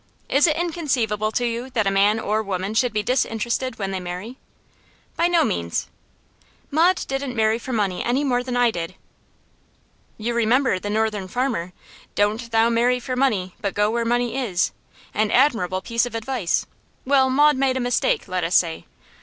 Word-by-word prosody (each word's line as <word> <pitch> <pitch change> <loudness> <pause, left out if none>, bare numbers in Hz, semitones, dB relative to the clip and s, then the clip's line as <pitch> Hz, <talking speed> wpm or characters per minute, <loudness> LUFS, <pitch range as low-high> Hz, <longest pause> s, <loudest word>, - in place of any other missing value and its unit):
Is 285 +4 +4
it 305 - +2
inconceivable 260 -11 -1
to 245 - 0
you 235 +2 -3
that 215 -3 +2
a 195 - +2
man 205 +3 +3
or 215 0 0
woman 195 0 -3
should 245 +2 +2
be 210 0 -1
disinterested 240 +1 -1
when 195 -2 -3
they 190 - -2
marry?' 180 +7 -6 0.8
'By 340 - +2
no 350 -1 +3
means.' 85 -1 -2 0.8
'Maud 340 +5 +3
didn't 270 -2 -3
marry 220 0 +2
for 260 - -7
money 200 -6 -1
any 255 +4 +1
more 250 -3 +1
than 250 0 -3
I 245 -1 +4
did.' 170 -1 -5 1.2
'You 230 +2 -2
remember 235 -2 +2
the 205 - -5
Northern 215 -2 -1
Farmer: 225 -6 -2 0.4
"Doan't 215 +3 0
thou 225 0 +3
marry 240 +2 +2
for 255 +1 -4
money, 210 -9 0
but 200 -2 -2
go 210 +1 +2
where 235 0 0
money 240 0 0
is." 195 -9 0 0.4
An 215 0 +1
admirable 220 -9 +2
piece 230 +1 0
of 235 - -8
advice. 230 -5 -1 0.4
Well, 265 -1 +4
Maud 295 +3 +4
made 260 -1 +1
a - - -1
mistake, 255 - 0
let 185 -1 -2
us 165 +2 0
say. 165 -2 +1
230 Hz, 180 wpm, -22 LUFS, 205-255 Hz, 1.2 s, Is